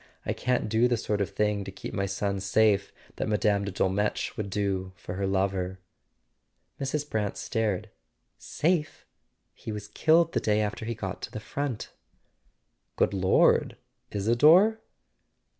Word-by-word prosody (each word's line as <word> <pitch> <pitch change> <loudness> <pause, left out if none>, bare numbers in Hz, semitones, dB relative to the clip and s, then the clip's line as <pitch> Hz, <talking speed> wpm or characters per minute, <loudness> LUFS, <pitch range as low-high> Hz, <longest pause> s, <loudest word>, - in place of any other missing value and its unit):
I - - 0
can't 125 -2 0
do 110 +3 +3
the 120 -1 +1
sort 105 -2 -1
of 100 - 0
thing 105 0 0
to 95 - -7
keep - - -8
my 100 0 -1
son 100 0 -2
safe 100 +1 +2 0.3
that - - -2
Mme. 105 -1 +1
de 100 - -3
Dolmetsch 95 +3 0
would 105 -2 -4
do 95 -2 -2
for 90 0 -8
her 95 +1 -2
lover." 95 -1 -1 1.0
Mrs. 145 +2 -2
Brant 105 -6 -2
stared. 110 -6 -2 0.5
"Safe? 160 -1 -1 0.5
He - - -7
was 105 -1 -6
killed 165 +6 +3
the - - +2
day 105 0 +1
after 110 +1 -2
he 115 +1 -3
got 95 -3 -5
to - - -6
the - - -5
front." 130 +2 -4 1.0
"Good - - +2
Lord—Isador?" 120 - +3
105 Hz, 145 wpm, -27 LUFS, 100-120 Hz, 1.0 s, do